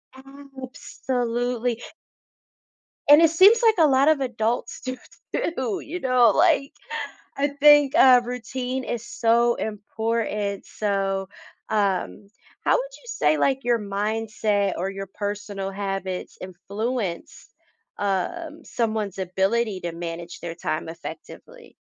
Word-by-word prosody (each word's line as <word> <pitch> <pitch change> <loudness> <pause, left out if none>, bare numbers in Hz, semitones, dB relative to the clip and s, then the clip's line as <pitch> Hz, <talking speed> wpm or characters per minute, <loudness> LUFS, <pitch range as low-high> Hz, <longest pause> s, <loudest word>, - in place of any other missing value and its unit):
Absolutely. 255 -3 -4 1.3
And 295 +3 +8
it 325 - +6
seems 395 +8 +6
like 445 -1 +5
a 320 -2 +6
lot 270 +2 +4
of 315 -2 +4
adults 240 -2 -2
do 255 -1 -4 0.4
too, 260 - -1
you 355 +4 -6
know, 250 -4 +4
like, 315 -4 +3 0.6
I 280 - +2
think, 290 0 +5
uh, 255 -6 +7
routine 250 +2 -4
is 235 -2 -4
so 235 +1 +2
important. 210 -1 -3
So, 195 -2 -2 0.4
um, 200 -1 -1 0.4
how - - +4
would - - -2
you - - -21
say 155 - +1
like 270 - +1
your 240 -1 +2
mindset 210 -1 -1
or 185 +3 -2
your 195 0 -6
personal 205 -1 -4
habits 195 -2 -4
influence, 200 +1 -4 0.5
um, 295 - -2
someone's 220 -4 -2
ability 195 +3 0
to 170 - -3
manage 170 0 -6
their 170 -1 -6
time 160 -1 -3
effectively? 475 - -10
230 Hz, 120 wpm, -24 LUFS, 195-265 Hz, 1.3 s, And